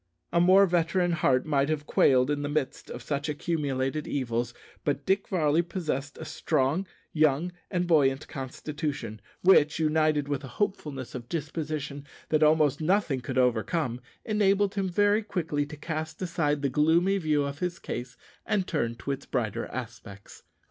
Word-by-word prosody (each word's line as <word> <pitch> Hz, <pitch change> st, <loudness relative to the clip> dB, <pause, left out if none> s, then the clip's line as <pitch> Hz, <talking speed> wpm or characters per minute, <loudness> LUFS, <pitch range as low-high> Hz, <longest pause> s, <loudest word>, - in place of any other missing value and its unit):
A 170 Hz, -, +4 dB
more 190 Hz, +3 st, +7 dB
veteran 175 Hz, 0 st, +1 dB
heart 135 Hz, -6 st, +2 dB
might 140 Hz, -1 st, +1 dB
have 150 Hz, -2 st, -1 dB
quailed 130 Hz, -1 st, +4 dB
in 145 Hz, 0 st, -1 dB
the 145 Hz, -, -2 dB
midst 145 Hz, -2 st, -2 dB
of 120 Hz, -, -7 dB
such 145 Hz, +2 st, -2 dB
accumulated 145 Hz, -2 st, -1 dB
evils; 120 Hz, -3 st, -1 dB, 0.3 s
but 145 Hz, -1 st, -1 dB
Dick 195 Hz, +1 st, +1 dB
Varley 160 Hz, -3 st, +2 dB
possessed 155 Hz, -6 st, -4 dB
a -, -, -7 dB
strong, 145 Hz, +9 st, 0 dB, 0.3 s
young, 155 Hz, +2 st, +2 dB, 0.2 s
and 180 Hz, -2 st, 0 dB
buoyant 145 Hz, -4 st, +3 dB
constitution, 135 Hz, -4 st, -5 dB, 0.2 s
which, 155 Hz, -5 st, +5 dB
united 155 Hz, -2 st, +2 dB
with 145 Hz, -1 st, -2 dB
a -, -, -6 dB
hopefulness 150 Hz, -, -2 dB
of 125 Hz, -3 st, -7 dB
disposition 150 Hz, -3 st, -4 dB, 0.2 s
that 155 Hz, -1 st, +2 dB
almost 150 Hz, -2 st, +4 dB
nothing 165 Hz, -6 st, +1 dB
could 130 Hz, +1 st, -4 dB
overcome, 125 Hz, +2 st, +1 dB, 0.2 s
enabled 205 Hz, -2 st, +2 dB
him 195 Hz, -2 st, -1 dB
very 205 Hz, +4 st, +3 dB
quickly 165 Hz, -8 st, -2 dB
to 150 Hz, 0 st, -9 dB
cast 160 Hz, +1 st, -4 dB
aside 155 Hz, -5 st, -1 dB
the -, -, +3 dB
gloomy 165 Hz, +8 st, +3 dB
view 155 Hz, -4 st, +1 dB
of 140 Hz, +1 st, -4 dB
his 180 Hz, -1 st, -2 dB
case 120 Hz, 0 st, -6 dB, 0.3 s
and 210 Hz, -4 st, 0 dB
turn 120 Hz, -10 st, -1 dB
to 140 Hz, -, -4 dB
its 140 Hz, 0 st, -5 dB
brighter 115 Hz, -6 st, -2 dB
aspects. 115 Hz, -5 st, -9 dB
150 Hz, 160 wpm, -28 LUFS, 135-170 Hz, 0.3 s, more